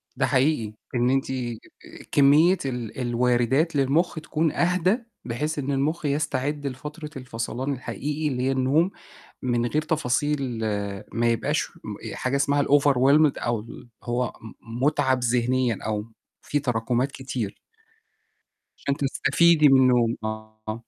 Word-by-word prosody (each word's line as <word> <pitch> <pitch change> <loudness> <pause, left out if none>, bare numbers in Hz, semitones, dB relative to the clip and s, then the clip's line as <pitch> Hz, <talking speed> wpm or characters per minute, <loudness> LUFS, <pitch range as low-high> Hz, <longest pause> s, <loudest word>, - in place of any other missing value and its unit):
ده 135 +1 +1
حقيقي، 130 -4 +1 0.2
إن 120 0 +2
أنتِ 135 +1 +2 0.9
كمّية 150 +6 +5
ال 125 -3 -4
الوارِدات 125 +6 +1
للمُخ 145 +6 +2
تكون 155 0 0
أهدى، 180 +4 +2 0.3
بحيث 145 +6 -2
إن 140 0 -2
المُخ 150 +4 -1
يستعد 145 0 -1
لفترة 150 +4 -7
الفصلان 125 +2 -4
الحقيقي 150 +4 -3
اللي 125 -3 -1
هي 135 - +2
النوم، 135 +7 +2 0.5
من 120 -2 0
غير 150 +6 0
تفاصيل 145 -4 -1 0.6
ما 120 +1 +2
يبقاش 115 - 0
م - - -6 0.2
حاجة 130 +2 -2
اسمها 140 +1 +2
الoverwhelmed 140 +1 +4
أو 120 -1 -1
اللي 115 +2 -11 0.2
هو 120 +1 -1
م 115 +2 -8
مُتعَب 130 -3 +2
ذِهنيًا 125 -1 +1
أو 105 -1 -2 0.4
في 145 - -1
تراكمات 125 0 0
كتير. 130 -7 -5 1.2
عشان 140 - -1
تستفيدي 150 +3 +4
من 135 -1 +6
النوم، 120 -2 +3
آه. 110 0 -6
135 Hz, 125 wpm, -25 LUFS, 120-150 Hz, 1.2 s, من